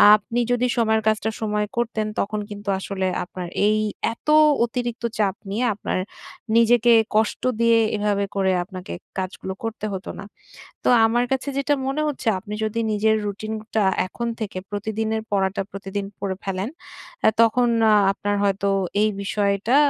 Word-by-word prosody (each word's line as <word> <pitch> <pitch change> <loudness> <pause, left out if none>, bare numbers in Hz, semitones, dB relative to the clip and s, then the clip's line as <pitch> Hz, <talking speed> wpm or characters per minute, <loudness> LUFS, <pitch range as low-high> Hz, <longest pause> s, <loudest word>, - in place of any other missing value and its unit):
আপনি 220 +3 -3
যদি 245 0 +2
সময়ের 220 -1 +2
কাজটা 220 0 +2
সময় 210 -1 0
করতেন। 220 -2 -1
তখন 210 +1 -1
কিন্তু 205 0 -6
আসলে 190 -1 -2 0.2
আপনার 180 0 -7 0.2
এই 215 0 +3 0.4
এত 230 - -22 0.4
অতিরিক্ত 240 0 -4 0.2
চাপ 200 -3 +2
নিয়ে 220 +6 0
আপনার 195 - -2 0.6
নিজেকে 235 0 +5 0.2
কষ্ট 215 0 +1 0.2
দিয়ে 230 0 +5 0.2
এভাবে 205 -1 +1
করে 190 -1 +2
আপনাকে 185 0 -8 0.3
কাজগুলো 190 0 -4
করতে 225 -1 -4
হতো 190 0 -5
না। - - -7 0.6
তো - - +2 0.2
আমার 240 +2 +2
কাছে 265 +1 0
যেটা 280 +1 +2
মনে 275 +3 -1
হচ্ছে। 280 -4 -4
আপনি 205 +3 -8
যদি 215 +1 -2
নিজের 215 +1 +3
রুটিনটা, 215 +1 -2 0.2
এখন 235 +5 -4
থেকে 210 -4 -4
প্রতিদিনের 220 +2 -2
পড়াটা 195 -1 +1
প্রতিদিন 195 0 -4
পড়ে 195 -1 -2
ফেলেন। 195 +2 -2 0.6
এ - - +9
তখন 240 +2 +4 0.2
আ - - +6 0.2
আপনার 205 +1 -2
হয়তো 200 0 +1 0.3
এই 215 - +4
বিষয়টা 200 +3 +1
215 Hz, 150 wpm, -23 LUFS, 200-230 Hz, 0.6 s, এ